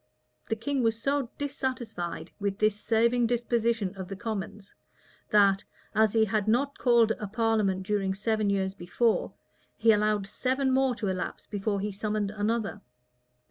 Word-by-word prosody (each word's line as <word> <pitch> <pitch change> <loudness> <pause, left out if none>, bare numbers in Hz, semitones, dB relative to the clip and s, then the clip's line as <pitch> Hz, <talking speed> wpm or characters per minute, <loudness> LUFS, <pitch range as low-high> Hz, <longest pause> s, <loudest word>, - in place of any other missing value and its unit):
The 225 - +1
king 270 +4 -1
was 225 -1 +1
so 275 0 0
dissatisfied 240 - -4
with 200 -1 -2
this 215 -1 +2
saving 230 +3 +2
disposition 230 -4 0
of 190 -2 -6
the 195 - -6
commons, 205 -1 -5 0.6
that, 200 -2 +4 0.3
as 220 -1 +3
he 220 -1 +4
had 215 -1 -1
not 275 +6 +1
called 235 -3 +4
a 210 - -4
parliament 215 -3 +1
during 195 -2 0
seven 215 0 0
years 190 -1 0
before, 195 +5 0 0.5
he 225 - +5
allowed 210 -1 +2
seven 260 +6 0
more 260 -1 +2
to 210 - -3
elapse 185 -1 -3
before 205 -1 -2
he 210 +1 -2
summoned 210 0 -2
another. 215 +1 -2
215 Hz, 150 wpm, -28 LUFS, 200-235 Hz, 0.6 s, he